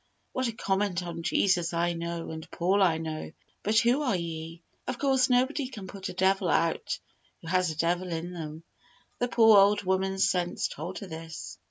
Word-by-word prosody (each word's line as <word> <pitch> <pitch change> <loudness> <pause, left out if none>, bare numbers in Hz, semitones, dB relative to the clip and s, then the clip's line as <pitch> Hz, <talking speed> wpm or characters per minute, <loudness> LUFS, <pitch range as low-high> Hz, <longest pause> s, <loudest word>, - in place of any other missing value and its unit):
What 255 -1 -1
a - - -1
comment 195 -4 -1
on 170 -1 -5
"Jesus 175 0 +2
I 170 +1 +1
know, 170 0 -4
and 160 0 -8
Paul 190 +4 +1
I 170 -4 +4
know; 155 -1 -5 0.3
but 215 +2 +1
who 240 +5 +4
are 255 -8 +1
ye?" 165 -1 -5 0.2
Of 255 - -2
course, 265 -2 +3
nobody 260 +3 +2
can 215 -7 -8
put 190 0 -6
a - - -6
devil 190 0 +2
out 165 0 +1 0.5
who - - -9
has 185 0 +2
a 155 - -5
devil 175 +3 +1
in 170 +2 -4
them. 160 -1 -7 0.6
The 245 - +1
poor 225 -3 +7
old 205 +1 +4
woman's 190 0 +1
sense 175 -1 0
told 185 +2 -6
her 200 - -6
this. 160 -1 -8
185 Hz, 190 wpm, -28 LUFS, 165-205 Hz, 0.6 s, poor